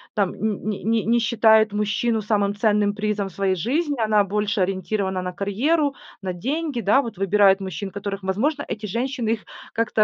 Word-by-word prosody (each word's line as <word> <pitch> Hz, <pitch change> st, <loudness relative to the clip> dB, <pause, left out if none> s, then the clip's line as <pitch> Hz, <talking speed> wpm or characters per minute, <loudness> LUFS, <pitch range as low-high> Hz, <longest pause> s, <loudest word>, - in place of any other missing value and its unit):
там 200 Hz, -4 st, +1 dB
нь 215 Hz, -2 st, -2 dB
не 210 Hz, -2 st, -3 dB
не 225 Hz, 0 st, +1 dB
не 235 Hz, +2 st, +3 dB
считает 220 Hz, -1 st, +4 dB
мужчину 210 Hz, +2 st, 0 dB
самым 205 Hz, -1 st, +1 dB
ценным 210 Hz, -1 st, +2 dB
призом 210 Hz, -1 st, -1 dB
в -, -, -17 dB
своей 195 Hz, 0 st, 0 dB
жизни. 285 Hz, -, -1 dB
Она 215 Hz, -1 st, +3 dB
больше 205 Hz, 0 st, -1 dB
ориентирована 190 Hz, 0 st, -1 dB
на 180 Hz, 0 st, -4 dB
карьеру, 275 Hz, -, +1 dB, 0.3 s
на 185 Hz, -1 st, -2 dB
деньги, 275 Hz, -, -2 dB
да, 220 Hz, +7 st, +3 dB
вот 230 Hz, -4 st, -7 dB
выбирает 195 Hz, 0 st, +4 dB
мужчин, 195 Hz, +1 st, -5 dB
которых, 200 Hz, 0 st, -5 dB
возможно, 270 Hz, +11 st, 0 dB
эти 215 Hz, 0 st, -5 dB
женщины 240 Hz, +2 st, -2 dB
их 220 Hz, -, -6 dB, 0.3 s
как-то 225 Hz, -1 st, +2 dB
210 Hz, 180 wpm, -23 LUFS, 195-230 Hz, 0.3 s, считает